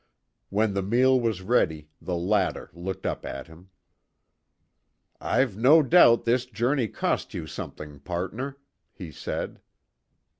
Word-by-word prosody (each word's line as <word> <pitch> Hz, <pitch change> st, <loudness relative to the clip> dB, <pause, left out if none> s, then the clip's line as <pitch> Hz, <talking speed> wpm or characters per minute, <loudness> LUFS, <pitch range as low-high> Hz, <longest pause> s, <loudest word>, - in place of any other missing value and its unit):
When 105 Hz, +1 st, +1 dB
the 100 Hz, -, 0 dB
meal 125 Hz, +6 st, +3 dB
was 110 Hz, -5 st, -1 dB
ready, 80 Hz, -8 st, +1 dB
the 90 Hz, -, -3 dB
latter 95 Hz, +3 st, 0 dB
looked 90 Hz, +2 st, -6 dB
up -, -, -2 dB
at 70 Hz, -, -6 dB
him. 85 Hz, +3 st, -17 dB, 1.5 s
"I've 130 Hz, -7 st, +1 dB
no 140 Hz, +9 st, +6 dB
doubt 125 Hz, -7 st, +6 dB
this 125 Hz, +2 st, +1 dB
journey 120 Hz, +2 st, 0 dB
cost -, -, -2 dB
you -, -, -4 dB
something, 75 Hz, -2 st, -8 dB
partner," 95 Hz, -, -4 dB, 0.4 s
he 85 Hz, -4 st, -9 dB
said. -, -, -5 dB
105 Hz, 125 wpm, -26 LUFS, 90-125 Hz, 1.5 s, no